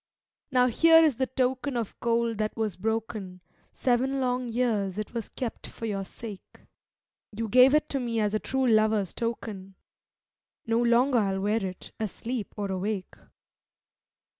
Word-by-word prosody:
'Now 250 Hz, -1 st, +4 dB
here 325 Hz, +7 st, +6 dB
is 295 Hz, -7 st, +3 dB
the 260 Hz, -, 0 dB
token 260 Hz, +1 st, -1 dB
of 230 Hz, -4 st, -3 dB
gold 230 Hz, -1 st, 0 dB
that 215 Hz, +1 st, -2 dB
was 220 Hz, -4 st, -1 dB
broken; 215 Hz, -2 st, -3 dB, 0.3 s
Seven 260 Hz, +2 st, +1 dB
long 250 Hz, -1 st, -1 dB
years 220 Hz, -5 st, 0 dB
it 215 Hz, +1 st, -5 dB
was 230 Hz, -3 st, -4 dB
kept 245 Hz, -4 st, -5 dB
for 230 Hz, -, -8 dB
your 200 Hz, -3 st, -2 dB
sake; 205 Hz, 0 st, -10 dB, 0.8 s
You 225 Hz, 0 st, -2 dB
gave 255 Hz, +6 st, +6 dB
it 305 Hz, 0 st, +2 dB
to 275 Hz, -, -1 dB
me 235 Hz, -2 st, -1 dB
as 210 Hz, -1 st, +1 dB
a 215 Hz, -, +1 dB
true 265 Hz, +3 st, -1 dB
lover's 215 Hz, -4 st, +3 dB
token; 210 Hz, -5 st, -5 dB, 0.9 s
No 230 Hz, 0 st, +1 dB
longer 240 Hz, +2 st, +4 dB
I'll 195 Hz, -2 st, 0 dB
wear 210 Hz, +2 st, +1 dB
it, 185 Hz, -1 st, -6 dB
asleep 225 Hz, +1 st, -4 dB
or 200 Hz, -2 st, -2 dB
awake.' 190 Hz, +1 st, -3 dB
230 Hz, 155 wpm, -27 LUFS, 210-250 Hz, 0.9 s, here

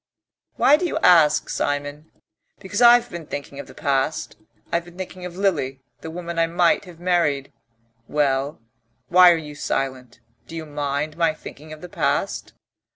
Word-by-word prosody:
"Why 295 Hz, -, +5 dB
do 355 Hz, -, -1 dB
you -, -, -2 dB
ask, 160 Hz, -4 st, +5 dB
Simon?" 145 Hz, +2 st, -3 dB, 0.5 s
"Because 205 Hz, +4 st, -4 dB
I've 240 Hz, 0 st, +6 dB
been 170 Hz, -3 st, -7 dB
thinking 140 Hz, 0 st, -7 dB
of -, -, -8 dB
the -, -, -14 dB
past. 140 Hz, 0 st, -1 dB, 0.4 s
I've 170 Hz, 0 st, 0 dB
been 175 Hz, 0 st, -15 dB
thinking 185 Hz, -1 st, -7 dB
of 175 Hz, 0 st, -11 dB
Lily, 150 Hz, -9 st, 0 dB, 0.2 s
the 160 Hz, -, -8 dB
woman 170 Hz, 0 st, -5 dB
I 165 Hz, -, +3 dB
might 170 Hz, +3 st, +2 dB
have 175 Hz, -3 st, -13 dB
married.... 170 Hz, -6 st, 0 dB, 0.5 s
Well, 140 Hz, -1 st, 0 dB, 0.5 s
why 180 Hz, 0 st, +8 dB
are 170 Hz, -, +2 dB
you 150 Hz, -2 st, -8 dB
silent? 130 Hz, -3 st, -3 dB, 0.3 s
Do 165 Hz, -, -9 dB
you 160 Hz, -1 st, -5 dB
mind 145 Hz, +1 st, -3 dB
my 165 Hz, -2 st, +2 dB
thinking 155 Hz, 0 st, -11 dB
of 155 Hz, 0 st, -10 dB
the 180 Hz, -, -8 dB
past?" 160 Hz, +1 st, -1 dB
160 Hz, 165 wpm, -22 LUFS, 145-175 Hz, 0.5 s, why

